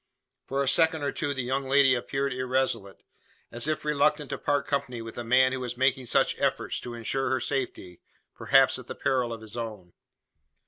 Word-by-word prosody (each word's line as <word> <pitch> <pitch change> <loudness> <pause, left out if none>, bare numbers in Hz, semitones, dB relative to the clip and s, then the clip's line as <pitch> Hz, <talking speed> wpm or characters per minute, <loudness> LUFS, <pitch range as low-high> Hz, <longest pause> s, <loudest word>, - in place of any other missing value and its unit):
For 140 +1 0
a - - -3
second 160 +1 +3
or 140 - 0
two 145 -2 -2
the 130 - -2
young 135 +2 -1
lady 135 -1 +5
appeared 135 +2 -2
irresolute 130 -6 -2 0.5
as 120 +5 -1
if 155 -1 -2
reluctant 150 0 +1
to - - -3
part 145 -1 0
company 140 -4 -2
with 115 0 -7
the 120 - -6
man 130 +2 +4
who 130 - -3
was 125 -1 -5
making 130 0 +1
such - - +3
efforts - - 0
to 120 -1 -7
ensure 130 +3 -1
her 130 0 +1
safety 95 -9 -3 0.3
perhaps - - +3
at - - -12
the - - -6
peril 125 -3 0
of 115 -1 -6
his 110 0 -6
own. 105 -7 -6
130 Hz, 195 wpm, -27 LUFS, 120-140 Hz, 0.5 s, lady